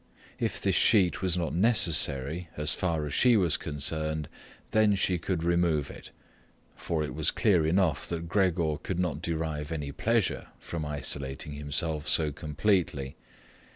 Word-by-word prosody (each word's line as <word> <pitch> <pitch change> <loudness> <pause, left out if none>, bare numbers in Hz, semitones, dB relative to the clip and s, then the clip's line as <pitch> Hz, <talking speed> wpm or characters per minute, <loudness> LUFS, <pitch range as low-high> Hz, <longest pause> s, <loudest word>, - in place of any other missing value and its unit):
If - - -2
this - - 0
sheet 95 -6 +3
was 90 -2 +1
not 85 -3 -2
necessary 85 - +3
as 75 0 +2
far 80 -4 -1
as 70 - -5
she 125 -3 +4
was 90 -6 +2
concerned, 75 +1 -2 0.4
then 110 -2 +3
she 90 -2 0
could 85 0 -2
remove 85 -4 +1
it, - - -12 0.7
for 80 -2 -2
it 75 - -5
was 80 +1 0
clear 90 -7 +2
enough 85 -4 +1
that 85 0 -4
Gregor 85 -4 +1
could 95 - -4
not 90 -1 -2
derive 80 -2 -3
any 75 -3 -4
pleasure - - 0
from 80 -3 -5
isolating 70 0 -3
himself 75 +2 -2
away - - +5
so 75 -2 0
completely. 75 -2 -1
80 Hz, 155 wpm, -28 LUFS, 75-90 Hz, 0.7 s, away